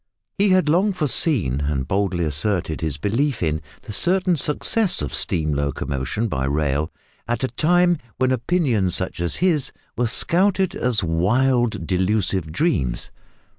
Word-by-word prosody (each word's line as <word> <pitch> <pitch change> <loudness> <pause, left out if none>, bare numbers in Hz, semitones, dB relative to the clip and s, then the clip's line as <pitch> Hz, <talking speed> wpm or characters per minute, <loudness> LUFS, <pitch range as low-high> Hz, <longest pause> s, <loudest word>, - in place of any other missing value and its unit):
He 200 0 +3
had 185 -3 +3
long 185 +7 +2
foreseen, 135 - +1
and 70 -3 -2
boldly 95 -3 -1
asserted 80 +2 -1
his 80 -3 -1
belief 115 - -1
in, 80 -1 -1 0.2
the - - -9
certain 185 - +2
success 180 +7 +2
of - - -5
steam 80 -7 0
locomotion 70 - -2
by 65 -9 -2
rail, 75 +2 -1 0.4
at 120 +1 -2
a - - +1
time 175 +1 +2 0.2
when 130 0 +1
opinions 125 - +1
such - - -3
as 85 - +3
his 160 -7 +1 0.2
were 120 - 0
scouted 185 - +2
as 120 -4 0
wild 120 +9 +1
delusive 95 -3 -1
dreams. 80 - -1
110 Hz, 140 wpm, -21 LUFS, -, 0.4 s, He